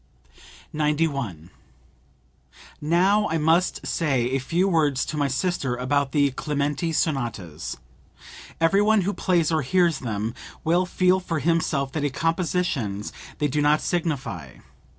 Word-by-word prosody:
91. 145 Hz, -, -1 dB, 1.3 s
"Now 185 Hz, +7 st, +3 dB
I 165 Hz, -, 0 dB
must 165 Hz, +4 st, +2 dB
say 130 Hz, -7 st, 0 dB
a 135 Hz, -, +1 dB
few 170 Hz, +8 st, 0 dB
words 150 Hz, -7 st, +2 dB
to -, -, -5 dB
my 145 Hz, -1 st, +1 dB
sister 135 Hz, -2 st, -1 dB
about 135 Hz, +2 st, 0 dB
the 140 Hz, -1 st, +3 dB
Clementi 145 Hz, +3 st, -2 dB
sonatas. 120 Hz, -, -2 dB, 0.8 s
Every 165 Hz, +5 st, +4 dB
one 215 Hz, 0 st, +4 dB
who 200 Hz, +3 st, -1 dB
plays 170 Hz, -5 st, +1 dB
or 160 Hz, -1 st, +2 dB
hears 170 Hz, +1 st, +2 dB
them 110 Hz, -2 st, -3 dB, 0.3 s
will 175 Hz, +3 st, +2 dB
feel 185 Hz, +1 st, +3 dB
for 170 Hz, -3 st, -3 dB
himself 155 Hz, -4 st, 0 dB
that 150 Hz, +1 st, -3 dB
as 145 Hz, -2 st, -1 dB
compositions 165 Hz, -, -1 dB, 0.2 s
they 150 Hz, -, +1 dB
do 150 Hz, +2 st, 0 dB
not 150 Hz, +1 st, +4 dB
signify. 135 Hz, -, -3 dB
150 Hz, 130 wpm, -24 LUFS, 135-170 Hz, 1.3 s, Every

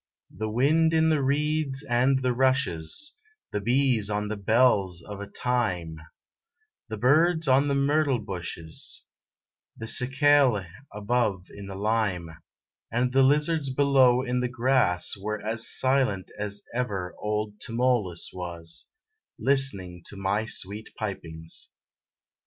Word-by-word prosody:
The 110 Hz, 0 st, -3 dB
wind 155 Hz, +8 st, +3 dB
in 160 Hz, 0 st, +4 dB
the 155 Hz, -3 st, +2 dB
reeds 145 Hz, 0 st, 0 dB
and 130 Hz, +1 st, +2 dB
the 125 Hz, -1 st, +1 dB
rushes, 130 Hz, -, 0 dB, 0.4 s
The 105 Hz, -, -2 dB
bees 120 Hz, -2 st, +2 dB
on 105 Hz, 0 st, -2 dB
the 110 Hz, -, -2 dB
bells 100 Hz, -5 st, +2 dB
of 105 Hz, +3 st, -8 dB, 0.2 s
thyme, 95 Hz, -10 st, -1 dB, 0.9 s
The 110 Hz, -, -4 dB
birds 160 Hz, +7 st, +3 dB
on 135 Hz, +2 st, +4 dB
the 140 Hz, -, +1 dB
myrtle 140 Hz, -1 st, +2 dB
bushes, 90 Hz, -6 st, -5 dB, 0.7 s
The 110 Hz, -, -6 dB
cicale 135 Hz, -3 st, +3 dB, 0.3 s
above 105 Hz, -3 st, -1 dB
in 100 Hz, -1 st, -9 dB
the 95 Hz, -, -7 dB
lime, 100 Hz, -5 st, -1 dB, 0.6 s
And 125 Hz, +2 st, 0 dB
the 135 Hz, -, +5 dB
lizards 150 Hz, +2 st, +2 dB
below 130 Hz, -2 st, +4 dB
in 125 Hz, -1 st, -1 dB
the 125 Hz, 0 st, -1 dB
grass, 125 Hz, -8 st, +1 dB
Were 105 Hz, +2 st, -4 dB
as 115 Hz, +1 st, 0 dB
silent 130 Hz, -8 st, +1 dB
as 105 Hz, -1 st, -4 dB
ever 100 Hz, -8 st, -3 dB
old 105 Hz, 0 st, -3 dB
Tmolus 115 Hz, -7 st, 0 dB
was, 85 Hz, -2 st, -6 dB, 0.5 s
Listening 100 Hz, -11 st, +1 dB
to -, -, -5 dB
my 100 Hz, +3 st, -1 dB
sweet 105 Hz, -1 st, -3 dB
pipings. 80 Hz, -6 st, -4 dB
115 Hz, 125 wpm, -26 LUFS, 100-135 Hz, 0.9 s, the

